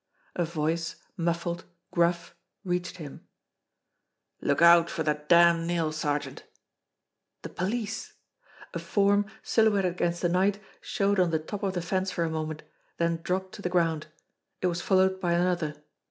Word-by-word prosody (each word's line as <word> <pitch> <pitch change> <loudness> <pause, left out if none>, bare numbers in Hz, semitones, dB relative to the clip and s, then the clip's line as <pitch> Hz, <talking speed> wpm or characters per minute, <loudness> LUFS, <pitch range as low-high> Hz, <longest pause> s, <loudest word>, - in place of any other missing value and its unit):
A 175 - +1
voice, 165 +1 -2 0.2
muffled, 170 -1 -2 0.3
gruff, 170 0 +1 0.3
reached 180 -1 -2
him: 150 -5 -10 1.1
"Look 140 - +1
out 170 0 +7
for 160 - -2
that 150 0 -2
damned 170 -1 +6
nail, 165 -2 0
sergeant!" 150 -1 -2 1.0
The - - -6
police! 215 +3 -3 0.6
A - - -3
form, 205 0 +2 0.2
silhouetted 205 -5 +3
against 175 -1 -1
the 175 - +3
night, 190 +3 +2 0.2
showed 200 0 0
on 180 -2 +4
the 160 - +1
top 175 +6 -6
of 195 -2 -1
the 175 - -2
fence 185 +2 -1
for 170 - -1
a 165 - -1
moment, 155 -1 -4 0.3
then 170 0 0
dropped 185 +2 -2
to 205 - -9
the 180 - -1
ground. 165 -4 +1 0.5
It - - -2
was 175 -1 0
followed 190 0 +3
by 175 -2 +1
another. 170 -3 0
175 Hz, 155 wpm, -28 LUFS, 165-185 Hz, 1.1 s, out